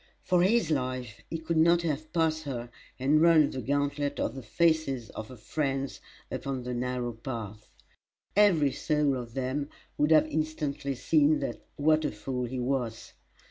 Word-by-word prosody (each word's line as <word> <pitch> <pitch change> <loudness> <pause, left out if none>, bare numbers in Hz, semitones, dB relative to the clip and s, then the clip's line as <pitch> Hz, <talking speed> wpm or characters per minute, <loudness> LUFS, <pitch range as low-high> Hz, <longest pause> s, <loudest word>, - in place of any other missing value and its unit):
For 180 -2 +3
his 210 0 +3
life 130 -5 -2
he 165 - -2
could 160 +1 -2
not 170 +2 +5
have 155 -1 -2
passed 160 -2 +1
her 120 -3 -5 0.3
and 145 +4 +3
run 160 -3 +6
the 130 - -4
gauntlet 145 0 -1
of - - -1
the 135 - -7
faces 140 -1 +1
of 110 - -7
her 130 - -11
friends 135 +3 -2 0.3
upon 135 -2 -3
the 125 0 -4
narrow 125 0 -2
path. 110 -3 -7 0.7
Every 175 -9 +5
soul 150 -2 +1
of 120 -2 -7
them 135 +2 -2 0.3
would 150 - +3
have 155 -1 +6
instantly 155 -3 -2
seen 150 +3 +3 0.4
what 155 +2 +3
a 150 - 0
fool 125 +4 -3
he 125 +2 -4
was. 125 -3 -2
140 Hz, 160 wpm, -29 LUFS, 125-155 Hz, 0.7 s, run